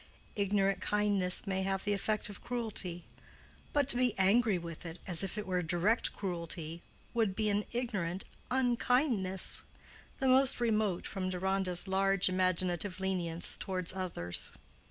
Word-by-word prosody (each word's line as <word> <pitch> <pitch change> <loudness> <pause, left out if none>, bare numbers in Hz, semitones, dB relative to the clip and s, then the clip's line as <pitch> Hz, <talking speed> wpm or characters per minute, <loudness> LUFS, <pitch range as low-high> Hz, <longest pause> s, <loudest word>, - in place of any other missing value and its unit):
Ignorant 200 -1 +1
kindness 205 -3 +2
may 190 -1 -1
have 195 0 -1
the 205 - 0
effect 215 +1 -1
of 205 -2 -10
cruelty; 205 -8 -2 0.7
but 285 -2 +2
to - - +7
be 250 -2 +1
angry 200 +2 +3
with 170 -2 -7
it 165 0 -7
as 175 -4 +1
if 195 +1 -4
it 210 - -3
were 185 -2 -1
direct 175 +7 +2
cruelty 170 -3 -3 0.3
would 220 -5 +1
be 215 0 0
an 205 +1 0
ignorant 205 -7 -2 0.3
_un_kindness, 245 -6 +2 0.6
the 270 - 0
most 260 0 +6
remote 215 -6 0
from 185 -2 -3
Deronda's 185 0 0
large 195 0 +3
imaginative 185 0 0
lenience 175 -3 -2
toward 185 -2 -2
others. 170 - -3
195 Hz, 140 wpm, -32 LUFS, 180-215 Hz, 0.7 s, to